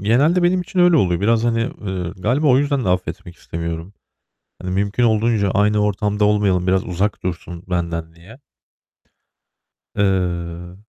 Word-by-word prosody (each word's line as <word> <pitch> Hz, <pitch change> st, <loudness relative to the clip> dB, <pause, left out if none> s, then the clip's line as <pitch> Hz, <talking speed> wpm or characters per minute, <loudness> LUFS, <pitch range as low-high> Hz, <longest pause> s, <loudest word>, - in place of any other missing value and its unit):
Genelde 140 Hz, -, +3 dB
benim 180 Hz, +1 st, +3 dB
için 180 Hz, +1 st, -6 dB
öyle 175 Hz, -2 st, +5 dB
oluyor. 90 Hz, -, +2 dB
Biraz, 115 Hz, +2 st, +2 dB
hani, 115 Hz, -1 st, +1 dB
eee, 95 Hz, -7 st, -4 dB
galiba 125 Hz, +11 st, 0 dB
o 130 Hz, -1 st, +5 dB
yüzden 140 Hz, -2 st, 0 dB
de -, -, 0 dB
affetmek 90 Hz, 0 st, -3 dB
istemiyorum. 85 Hz, +3 st, -6 dB, 0.7 s
Hani, 90 Hz, -, -4 dB
mümkün 100 Hz, +5 st, 0 dB
olduğunca 110 Hz, -3 st, +2 dB
aynı 105 Hz, +2 st, +2 dB
ortamda 105 Hz, 0 st, 0 dB
olmayalım, 100 Hz, -3 st, +2 dB
biraz 95 Hz, 0 st, +2 dB
uzak 95 Hz, +4 st, -2 dB
dursun 90 Hz, -1 st, -5 dB
benden 85 Hz, -2 st, -3 dB
diye. 95 Hz, +10 st, -15 dB, 1.6 s
Eee 90 Hz, -3 st, -1 dB
100 Hz, 145 wpm, -20 LUFS, 90-115 Hz, 1.6 s, öyle